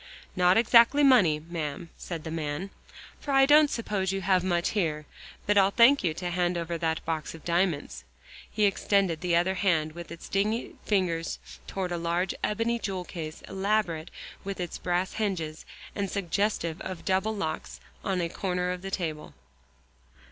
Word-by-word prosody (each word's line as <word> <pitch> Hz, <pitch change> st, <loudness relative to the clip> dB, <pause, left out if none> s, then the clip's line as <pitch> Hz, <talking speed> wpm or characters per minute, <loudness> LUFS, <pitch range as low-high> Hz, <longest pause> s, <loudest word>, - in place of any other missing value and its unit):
"Not 180 Hz, +1 st, +4 dB
exactly 235 Hz, +5 st, +6 dB
money, 205 Hz, -, +5 dB
ma'am," 160 Hz, 0 st, -5 dB
said 165 Hz, -3 st, -6 dB
the 160 Hz, -, -6 dB
man, 160 Hz, +4 st, -3 dB, 0.5 s
"for -, -, -10 dB
I 270 Hz, -1 st, +6 dB
don't 295 Hz, +1 st, +6 dB
suppose 205 Hz, -6 st, -1 dB
you 195 Hz, 0 st, -2 dB
have 185 Hz, -1 st, +2 dB
much 175 Hz, -2 st, +1 dB
here. 155 Hz, -7 st, -1 dB, 0.4 s
But 205 Hz, 0 st, +4 dB
I'll 195 Hz, 0 st, +5 dB
thank 235 Hz, +6 st, +5 dB
you 160 Hz, -3 st, 0 dB
to 175 Hz, +1 st, -4 dB
hand 175 Hz, 0 st, 0 dB
over 170 Hz, 0 st, -3 dB
that 160 Hz, -1 st, 0 dB
there -, -, -10 dB
box 160 Hz, -1 st, -3 dB
of 165 Hz, -, -14 dB
diamonds." 170 Hz, -, 0 dB, 0.5 s
He 210 Hz, 0 st, +1 dB
extended 195 Hz, -4 st, +1 dB
the 175 Hz, -2 st, +1 dB
other 175 Hz, +2 st, +2 dB
hand 165 Hz, -5 st, +1 dB
with 170 Hz, 0 st, -9 dB
its 170 Hz, -, -9 dB
dingy 210 Hz, +4 st, -1 dB
fingers 180 Hz, -5 st, 0 dB, 0.3 s
toward 185 Hz, -2 st, -3 dB
a 175 Hz, -, -1 dB
large 170 Hz, +2 st, 0 dB
ebony 230 Hz, +2 st, 0 dB
jewel 190 Hz, -4 st, -3 dB
case 155 Hz, -3 st, -7 dB
elaborate 190 Hz, -4 st, -1 dB, 0.3 s
with 195 Hz, -1 st, -5 dB
its 175 Hz, -1 st, -4 dB
brass 180 Hz, +2 st, -1 dB
hinges, 180 Hz, -8 st, -3 dB, 0.3 s
and 200 Hz, -1 st, -2 dB
suggestive 190 Hz, -3 st, -1 dB
of 185 Hz, -2 st, -6 dB
double 190 Hz, +4 st, +1 dB
locks, 175 Hz, -6 st, -4 dB, 0.2 s
on 190 Hz, -2 st, 0 dB
a 170 Hz, -, 0 dB
corner 180 Hz, +1 st, -2 dB
of 180 Hz, 0 st, -5 dB
the 195 Hz, -, -5 dB
table. 160 Hz, -5 st, -4 dB
180 Hz, 170 wpm, -28 LUFS, 165-200 Hz, 0.5 s, exactly